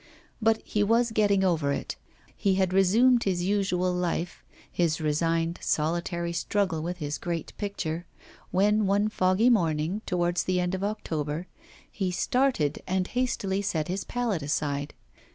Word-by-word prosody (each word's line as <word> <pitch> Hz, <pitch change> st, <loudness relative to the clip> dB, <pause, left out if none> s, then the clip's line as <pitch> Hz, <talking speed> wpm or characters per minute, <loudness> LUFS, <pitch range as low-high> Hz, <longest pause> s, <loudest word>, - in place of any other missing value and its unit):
But 225 Hz, 0 st, +2 dB
he 210 Hz, -, -1 dB
was 230 Hz, +2 st, +2 dB
getting 205 Hz, -3 st, +3 dB
over 160 Hz, -6 st, +1 dB
it, -, -, -3 dB, 0.4 s
he 195 Hz, -2 st, +1 dB
had 190 Hz, -1 st, +1 dB
resumed 230 Hz, +6 st, +4 dB
his 180 Hz, -3 st, 0 dB
usual 185 Hz, -2 st, +1 dB
life, 175 Hz, -1 st, -2 dB, 0.3 s
his 165 Hz, -3 st, +1 dB
resigned 165 Hz, +2 st, 0 dB
solitary 170 Hz, +2 st, -1 dB
struggle 170 Hz, -1 st, 0 dB
with 175 Hz, +2 st, -4 dB
his 150 Hz, -3 st, -4 dB
great 170 Hz, -2 st, -4 dB
picture, 175 Hz, -5 st, -3 dB, 0.4 s
when 205 Hz, +2 st, +2 dB
one 205 Hz, +2 st, +2 dB
foggy 195 Hz, +4 st, +3 dB
morning, 165 Hz, -1 st, +1 dB
towards 175 Hz, -2 st, 0 dB
the 185 Hz, -1 st, +1 dB
end 180 Hz, +1 st, -1 dB
of 190 Hz, +1 st, -2 dB
October, 165 Hz, -6 st, -3 dB, 0.5 s
he 190 Hz, -3 st, -2 dB
started 185 Hz, -, +1 dB
and 185 Hz, 0 st, 0 dB
hastily 205 Hz, -6 st, -1 dB
set 165 Hz, -6 st, -2 dB
his 190 Hz, +2 st, -2 dB
palette 235 Hz, -8 st, -2 dB
aside. 145 Hz, 0 st, -2 dB
180 Hz, 145 wpm, -27 LUFS, 165-205 Hz, 0.5 s, resumed